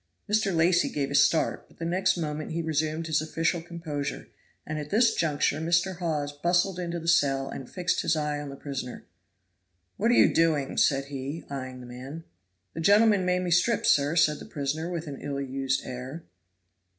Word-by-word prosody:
Mr. 210 -1 +2
Lacy 175 +1 +3
gave 140 -1 -2
a - - -3
start, 150 +3 +2
but - - -23
the 165 - -5
next 190 +2 +1
moment 155 -2 -3
he 165 0 -2
resumed 160 +1 -1
his 155 -2 +1
official 165 +2 -1
composure, 160 -4 -5 0.4
and 155 0 -4
at 150 0 -6
this 225 +4 +4
juncture 145 -2 +1
Mr. 175 +2 +1
Hawes 155 -5 -2
bustled 175 +5 +1
into 170 -1 -3
the 165 - -8
cell 135 -5 +3
and 130 - -7
fixed 180 0 0
his 165 - +1
eye 150 -1 -1
on 145 - -6
the 140 - -7
prisoner. 135 -3 -6 0.9
"What 225 +4 +2
are 240 - +4
you - - +5
doing?" 155 -4 +2
said 135 -1 +3
he, 140 +4 -5
eying 130 -2 -6
the - - -10
man. 130 +6 -8 0.5
"The 165 - -5
gentleman 205 +1 +5
made 180 0 +1
me 180 - -2
strip, 190 +7 +3
sir," 145 +2 +3
said 150 -3 +3
the - - -9
prisoner 150 +4 -3
with 170 -2 -4
an 140 -3 -7
ill 140 -1 -3
used 135 0 -1
air. 130 +6 -7
160 Hz, 190 wpm, -27 LUFS, 140-175 Hz, 0.9 s, you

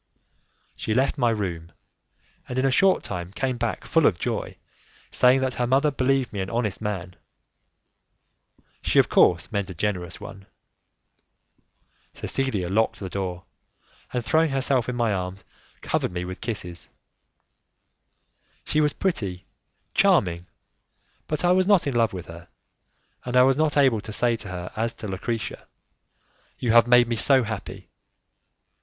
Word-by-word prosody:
She 110 - -2
left 135 +3 +1
my 120 -2 +3
room, 85 -7 -3 0.8
and 125 - -4
in 130 - +2
a 135 - +3
short 190 +7 +3
time 90 0 -5
came 125 +4 -2
back 120 -1 -3
full 165 -2 +3
of 85 - +1
joy, - - -3 0.5
saying 130 +1 +4
that 130 -1 0
her 120 0 -1
mother 140 +4 +3
believed 135 -2 0
me 100 - -4
an 95 - -4
honest 115 -4 -2
man; 95 -4 -4 1.7
she - - 0
of - - +6
course 85 +4 +3
meant 100 -3 -2
a 95 - -7
generous 90 -2 -3
one. 95 -1 -11 1.7
Cecilia 130 -10 -2
locked 110 +5 +1
the 95 -2 -6
door, 90 -2 -4 0.7
and 125 -2 -3
throwing 160 +3 +3
herself 135 -2 0
in 125 - -3
my 115 -3 +1
arms 90 0 -5 0.4
covered - - -1
me 90 0 -4
with 95 +1 -7
kisses. 90 -7 -5 1.8
She 155 - +1
was 150 -1 +2
pretty, 100 - -2 0.5
charming, 90 - +2 0.8
but 155 +2 -1
I 175 - +4
was 185 0 +3
not 200 -4 +4
in 140 - -1
love 115 -1 +2
with 90 -3 -7
her, 85 +1 -11 0.8
and 125 0 -1
I 125 - +8
was 135 +1 +4
not 150 0 +1
able 130 -6 +4
to 110 - -8
say 120 +2 +2
to 105 - -7
her 90 -1 -6
as 115 +1 -2
to 105 - -7
Lucrezia: 110 +4 -4 0.9
"You 120 - 0
have 120 +1 +6
made 120 0 +6
me 120 - -1
so 135 +2 +5
happy!" 110 0 -7
115 Hz, 155 wpm, -24 LUFS, 95-130 Hz, 1.8 s, I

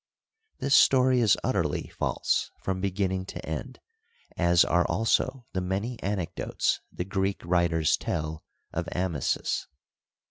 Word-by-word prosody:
This 140 - 0
story 130 -2 +6
is 110 -4 +4
utterly - - 0
false - - -1
from 95 -1 -2
beginning 95 -1 -1
to - - -7
end, - - -5 0.6
as 85 0 +4
are 90 0 +3
also 115 +6 +1
the 95 - -1
many 100 +6 -3
anecdotes 95 -4 -1
the 90 - -4
Greek 95 +1 -1
writers 85 -2 +2
tell 80 0 -3 0.3
of 85 0 -2
Amasis. 90 -7 -1
95 Hz, 120 wpm, -27 LUFS, 85-105 Hz, 0.6 s, story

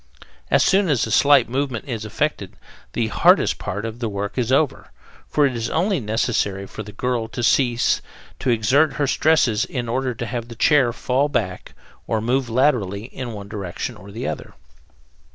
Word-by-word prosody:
As - - +4
soon 195 -1 +3
as 135 -6 +2
a 110 - -6
slight 140 0 +5
movement 130 -1 -2
is 115 -4 -4
effected, 105 -4 -2 0.4
the - - 0
hardest - - +4
part 105 +4 -4
of 115 +1 -6
the 115 -2 -2
work 100 0 -4
is 125 -1 -1
over, 140 0 +1 0.4
for 150 - +2
it 130 -3 0
is 115 -1 -2
only 185 +4 +1
necessary 105 -3 -1
for 110 - -8
the 105 0 -9
girl 120 +1 -2
to 120 - -5
cease 120 -1 +2 0.4
to 130 - -1
exert 130 +6 +3
her 145 - 0
stresses 135 -7 +2
in 125 -3 -4
order 130 +1 -1
to 120 - -4
have 115 +1 -4
the 120 - -10
chair 130 0 +4
fall 130 +4 0
back 95 -10 -3 0.3
or 110 - 0
move 125 +3 0
laterally 115 -6 +1
in 125 -1 -7
one 100 -1 -8
direction 100 -4 -5
or 100 - -13
the 115 +5 -5
other. - - -6
120 Hz, 185 wpm, -22 LUFS, 110-135 Hz, 0.4 s, slight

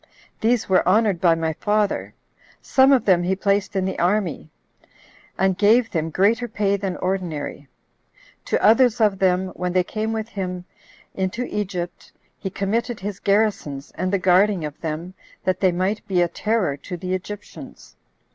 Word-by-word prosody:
These 230 0 +1
were 185 -2 +3
honored 205 -3 +2
by 170 -2 +5
my 160 -1 -1
father; 210 +4 -1 0.4
some 265 +1 +4
of 260 -5 +4
them 185 -3 +4
he 185 +2 0
placed 200 0 0
in 190 -1 +1
the 190 - -3
army, 175 - 0 0.9
and 190 -1 +2
gave 220 +4 +3
them 160 -2 -1
greater 220 +8 +2
pay 205 -2 0
than 195 -2 -3
ordinary; 175 -6 -3 0.8
to - - 0
others 240 +1 +5
of 210 -3 +2
them, 185 0 +2
when 180 -1 -4
they 185 0 +3
came 215 +4 -3
with 220 0 -3
him 180 -3 -5 0.5
into 190 +6 -2
Egypt, 185 -6 -5 0.3
he 190 - -4
committed 220 +5 -2
his 200 0 -5
garrisons, 195 -9 0
and 185 0 -2
the 200 - +2
guarding 185 -1 +3
of 150 -1 -8
them, 165 +3 -4 0.3
that 185 -1 0
they 185 -2 +3
might 185 +4 -2
be 180 -3 +2
a - - +1
terror 210 -5 -1
to 180 +5 -7
the 185 +2 -4
Egyptians. 205 +2 -8
190 Hz, 165 wpm, -22 LUFS, 180-210 Hz, 0.9 s, by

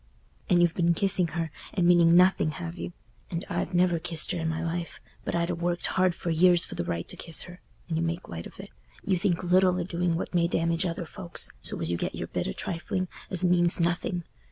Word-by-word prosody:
And 175 - +5
you've 175 -1 +4
been 170 -1 +2
kissing 190 -1 +2
her, 165 -1 -3 0.2
and 180 -4 +2
meaning 170 -1 +6
nothing, 180 -3 +5
have 175 -1 -6
you? 175 - -5 0.4
And 170 +2 -4
I 175 - -1
never 175 -1 +3
kissed 160 -1 -2
her 180 - -2
i' - - -3
my 160 0 -1
life—but 170 0 -5
I'd 170 0 0
ha' - - -1
worked 175 +1 -1
hard 185 -2 +2
for 170 - -3
years 175 +1 +5
for - - -9
the - - -2
right 85 0 -3
to - - -4
kiss 165 - -3
her. 180 0 -12 0.3
And 165 -2 -2
you 165 - 0
make 170 +2 -3
light 85 0 -6
of - - -17
it. - - -9 0.3
You 190 -3 +1
think 180 -2 0
little 185 +1 +4
o' - - 0
doing 175 -1 -1
what 170 - -4
may 170 -1 +3
damage 165 +1 +1
other 170 0 -4
folks, 175 0 -4
so - - +1
as 80 - +1
you 85 - 0
get - - -3
your - - -5
bit - - -2
o' - - -2
trifling, 180 - -3 0.2
as 185 -1 +3
means 175 -1 +4
nothing. 175 +1 0
175 Hz, 235 wpm, -27 LUFS, 165-180 Hz, 0.4 s, meaning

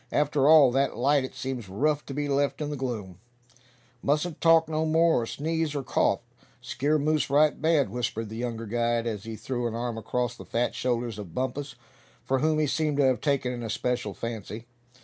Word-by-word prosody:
After 145 -1 +2
all 150 -5 +8
that 135 -2 0
light 140 +3 +3
it 130 - -7
seems 125 -6 -5
rough 150 +9 0
to 135 - -5
be 145 0 -1
left 140 0 0
in 150 -1 -3
the - - -3
gloom." 110 -9 -5 0.8
"Mustn't 150 +3 -1
talk 165 -1 +5
no 155 0 -1
more, 160 -2 +3
or - - -2
sneeze, 160 +2 -2
or 140 - -2
cough! - - +1 0.4
Skeer 150 +3 0
moose 155 0 +1
right 150 +2 +3
bad," 155 -9 +2
whispered 115 -1 -3
the 110 - -7
younger 115 -1 -4
guide, 115 +1 0
as 110 -3 -4
he 115 0 -5
threw 120 +1 -3
an 115 - -4
arm 120 -1 -3
across 125 +1 -2
the - - -10
fat 120 +1 -1
shoulders 120 -3 -2
of 95 -6 -9
Bumpus, 135 +2 -3 0.5
for 135 0 0
whom 155 +2 +2
he 155 - +2
seemed 150 0 0
to 145 - +4
have 130 -2 +2
taken 140 -4 0
an 120 - -5
especial 115 -2 -2
fancy. 115 -1 -6
130 Hz, 200 wpm, -27 LUFS, 120-150 Hz, 0.8 s, all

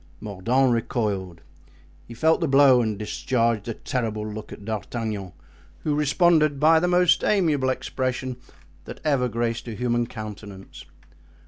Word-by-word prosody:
Mordaunt 120 +6 +1
recoiled; 100 -7 -2 0.7
he 115 - -10
felt 160 +8 +2
the 165 - +1
blow 135 -2 +6
and 110 -3 -2
discharged 115 +1 -1
a 115 - -3
terrible 110 -4 -3
look 105 0 -8
at 100 - -10
D'Artagnan, 110 -2 -4 0.5
who 150 - 0
responded 150 0 +3
by 160 +2 +5
the 180 - 0
most 180 0 +3
amiable 155 -10 +2
expression 130 -1 -3 0.5
that - - -9
ever 140 -5 +1
graced 115 +1 -2
a 115 - -5
human 120 0 0
countenance. 105 -4 -9
120 Hz, 135 wpm, -24 LUFS, 110-140 Hz, 0.7 s, blow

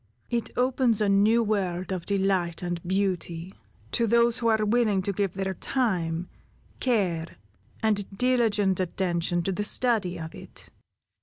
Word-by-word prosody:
It 235 -1 -1
opens 250 -3 +2
a 210 - +2
new 210 +4 +4
world 190 -4 -1
of 185 -3 -4
delight 190 -4 0
and 175 -1 -3
beauty, 185 -1 -2 0.4
to 235 -1 +1
those 235 +1 +3
who 230 - 0
are 220 -1 +3
willing 210 -3 +2
to 200 - -1
give 195 -2 -1
their 190 0 -2
time, 180 -7 -1 0.5
care, 185 -10 0 0.5
and 210 -3 +1
diligent 220 -6 +2
attention 175 -1 -1
to 195 - 0
the 205 +3 -2
study 210 -5 +1
of 160 0 -7
it. - - -12
195 Hz, 145 wpm, -26 LUFS, 180-225 Hz, 0.5 s, new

